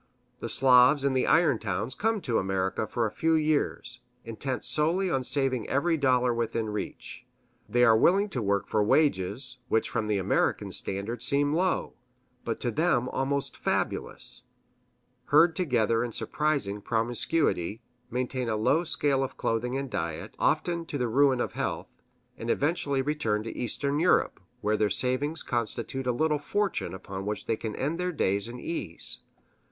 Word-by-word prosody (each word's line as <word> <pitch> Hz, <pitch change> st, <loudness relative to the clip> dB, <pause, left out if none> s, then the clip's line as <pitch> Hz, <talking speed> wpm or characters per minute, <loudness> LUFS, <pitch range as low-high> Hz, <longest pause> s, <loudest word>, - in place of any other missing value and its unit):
The 115 Hz, -, -4 dB
Slavs 130 Hz, +3 st, +6 dB
in 140 Hz, -, +2 dB
the 130 Hz, -, +1 dB
iron 165 Hz, -8 st, +4 dB
towns 105 Hz, +4 st, -3 dB
come 220 Hz, +3 st, 0 dB
to 120 Hz, -8 st, 0 dB
America 95 Hz, +2 st, -1 dB
for 120 Hz, +1 st, -1 dB
a 105 Hz, -, -2 dB
few 160 Hz, +8 st, +1 dB
years, 150 Hz, -5 st, 0 dB, 0.3 s
intent 120 Hz, +3 st, -4 dB
solely 170 Hz, +5 st, +1 dB
on 135 Hz, -, +1 dB
saving 130 Hz, -3 st, -1 dB
every 165 Hz, +5 st, +1 dB
dollar 125 Hz, -4 st, +2 dB
within 115 Hz, -1 st, -2 dB
reach. 110 Hz, +3 st, -6 dB, 0.4 s
They 120 Hz, +3 st, +3 dB
are 115 Hz, -2 st, +6 dB
willing 195 Hz, -, +4 dB
to 130 Hz, -, -3 dB
work 100 Hz, -1 st, 0 dB
for 110 Hz, -, +1 dB
wages 125 Hz, -1 st, +1 dB
which 110 Hz, -, 0 dB
from 110 Hz, -, -1 dB
the 105 Hz, -1 st, +1 dB
American 95 Hz, -, 0 dB
standard 105 Hz, +5 st, +2 dB
seem 145 Hz, +1 st, +2 dB
low, 185 Hz, +3 st, 0 dB, 0.5 s
but 115 Hz, -, -3 dB
to 120 Hz, -, -1 dB
them 130 Hz, -2 st, +1 dB
almost 140 Hz, +1 st, -1 dB
fabulous; -, -, -2 dB, 0.8 s
herd 165 Hz, -1 st, +5 dB
together 120 Hz, -, +1 dB
in 120 Hz, -, -4 dB
surprising 135 Hz, -7 st, -1 dB
promiscuity; 115 Hz, -, -1 dB, 0.3 s
maintain 125 Hz, 0 st, -2 dB
a 110 Hz, -, 0 dB
low 145 Hz, +10 st, +2 dB
scale 140 Hz, -4 st, +1 dB
of 135 Hz, -, -6 dB
clothing 120 Hz, +3 st, -1 dB
and 135 Hz, 0 st, -3 dB
diet, 80 Hz, -1 st, -4 dB
often 170 Hz, -1 st, +1 dB
to 145 Hz, -, -3 dB
the 125 Hz, -2 st, 0 dB
ruin 135 Hz, +2 st, +3 dB
of -, -, -1 dB
health; -, -, -4 dB, 0.5 s
and 115 Hz, -, -5 dB
eventually 140 Hz, -1 st, 0 dB
return 115 Hz, -8 st, -1 dB
to 115 Hz, -, -7 dB
Eastern 140 Hz, +4 st, -1 dB
Europe, 180 Hz, +2 st, +2 dB, 0.2 s
where 105 Hz, +1 st, +1 dB
their 105 Hz, -1 st, +2 dB
savings 130 Hz, -, 0 dB
constitute 120 Hz, +2 st, -3 dB
a -, -, +3 dB
little 150 Hz, +4 st, +1 dB
fortune 190 Hz, -, -2 dB
upon 95 Hz, 0 st, -7 dB
which 105 Hz, 0 st, -4 dB
they 115 Hz, -, 0 dB
can 110 Hz, -1 st, -5 dB
end 155 Hz, +6 st, -2 dB
their 180 Hz, 0 st, -1 dB
days 100 Hz, -, 0 dB
in 120 Hz, +1 st, -8 dB
ease. 100 Hz, -, -2 dB
125 Hz, 165 wpm, -27 LUFS, 110-145 Hz, 0.8 s, Slavs